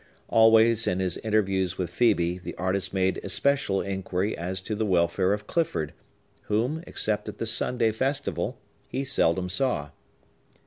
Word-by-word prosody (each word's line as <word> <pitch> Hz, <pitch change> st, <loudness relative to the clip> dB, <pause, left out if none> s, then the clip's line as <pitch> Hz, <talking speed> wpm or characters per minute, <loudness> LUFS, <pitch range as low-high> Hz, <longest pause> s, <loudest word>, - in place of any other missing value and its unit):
Always, 115 Hz, 0 st, +5 dB
in 90 Hz, -, 0 dB
his 90 Hz, -2 st, 0 dB
interviews 95 Hz, -4 st, 0 dB
with 90 Hz, -3 st, -3 dB
Phœbe, 90 Hz, -5 st, +1 dB
the -, -, -7 dB
artist 95 Hz, +1 st, -1 dB
made 95 Hz, -1 st, 0 dB
especial 140 Hz, -9 st, +1 dB
inquiry 95 Hz, +1 st, -2 dB
as 90 Hz, +3 st, -3 dB
to 100 Hz, -, -4 dB
the 110 Hz, +1 st, -1 dB
welfare 90 Hz, -1 st, +2 dB
of 105 Hz, 0 st, -2 dB
Clifford, 160 Hz, -, -1 dB, 0.5 s
whom, 125 Hz, +10 st, -1 dB
except 105 Hz, -1 st, -1 dB
at -, -, -9 dB
the -, -, -3 dB
Sunday 115 Hz, 0 st, +1 dB
festival, 135 Hz, +6 st, -2 dB, 0.3 s
he 135 Hz, -, -3 dB
seldom 90 Hz, -8 st, +1 dB
saw. 90 Hz, -, -1 dB
100 Hz, 145 wpm, -26 LUFS, 90-115 Hz, 0.5 s, Always